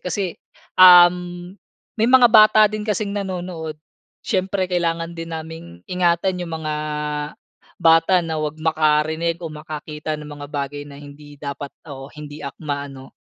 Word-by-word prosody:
Kasi, 185 +2 -2 0.6
um, 175 0 +6 0.4
may 225 +1 +1
mga 250 -1 +7
bata 215 0 +7
din 215 0 -5
kasing 205 -1 -1
nanonood. 180 -5 -5 0.5
Syempre 190 0 -1
kailangan 170 -2 -2
din 165 0 -7
naming 160 - -7 0.2
ingatan 180 +1 0
yung 165 -2 -4
mga 155 -1 -4 1.0
bata 165 +1 +4
na 160 -1 -3
wag 155 0 -3
makarinig 160 +1 +1
o 160 - -6
makakita 150 0 -6
ng 150 - -10
mga 145 - -6
bagay 145 0 -4
na 140 - -11
hindi 145 0 -13
dapat 140 0 -6 0.2
o 135 -3 -9
hindi 150 0 -10
akma 145 0 -5
ano. 135 -1 -12
165 Hz, 140 wpm, -21 LUFS, 150-180 Hz, 1.0 s, mga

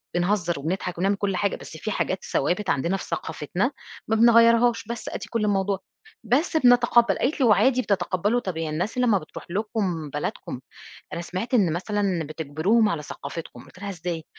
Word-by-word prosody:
بنهزّر، 175 -3 0
وبنضحك، 180 +4 -3
وبنعمل 195 +3 +2
كل 200 -1 -1
حاجة 200 +2 0
بس 160 - -10
في 215 - -4
حاجات 190 -2 -1
ثوابت 180 +8 0
عندنا 170 +8 +1
في - - -7
ثقافتنا 165 - -2 0.4
ما 220 - +2
بنغيرهاش، 230 0 +5
بس 235 -1 -5
آدي - - -5
كل 230 -2 0
الموضوع 195 -1 +1 0.4
بس 275 - +1
بنتقبّل" 240 -5 +5
قالت 285 +5 0
لي: 265 - +4
"وعادي 250 +3 +4
بتتقبّلوا 200 +2 0
طَب 185 -8 -5
يعني 165 -1 -2
الناس 175 +10 -3
لمّا 245 -5 +3
بتروح 155 - -9
لكم 195 -6 -2
بلدكم 145 -3 -4 0.5
أنا - - -3
سمعت 185 +8 -4
إن 195 -9 +4
مثلًا 190 -1 -1
بتجبروهم 160 +9 +1
على 165 -6 -2
ثقافتكم"، 145 +3 -8
قلت - - -17
لها: 200 +1 -5
"إزاي؟" 170 -3 -4
195 Hz, 170 wpm, -25 LUFS, 170-230 Hz, 0.5 s, بنغيرهاش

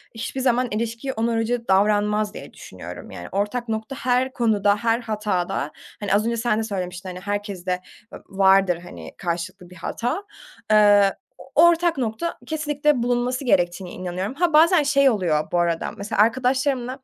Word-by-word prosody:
hiçbir 245 +4 -4
zaman 250 -1 +2
ilişkiye 230 +5 -3
onarıcı 230 +1 -1
davranmaz 210 +2 +2
diye - - -10
düşünüyorum. - - -10
Yani, - - -8
ortak 210 +5 -2
nokta 220 +5 -3
her 255 +1 0
konuda, 210 -5 +2
her 230 +2 +1
hatada, 210 - -2 0.3
hani, 205 -2 -1
az 210 +2 +2
önce 235 0 -1
sen 225 -2 +1
de - - -1
söylemiştin, 185 -3 -5
hani, 180 0 -7
herkeste 195 -2 -3 0.3
ı - - -6 0.2
vardır, 190 -2 +4
hani, 85 - -10
karşılıklı 175 +2 -4
bir 180 - -14
hata, 245 - -3 0.5
eee, 205 -2 +6 0.2
o - - -15 0.2
ortak 340 -1 +2
nokta 240 +6 -2
kesinlikle 295 -4 0
bulunması 245 +2 -1
gerektiğine 175 -4 +1
inanıyorum. 185 +4 -4
Ha, 335 +3 0
bazen 325 +1 +6
şey 280 -1 +4
oluyor 175 -9 0
bu 175 - +2
arada, 170 -1 0
mesela 200 +1 0
arkadaşlarımla, 255 +2 +1
220 Hz, 155 wpm, -23 LUFS, 190-250 Hz, 0.5 s, eee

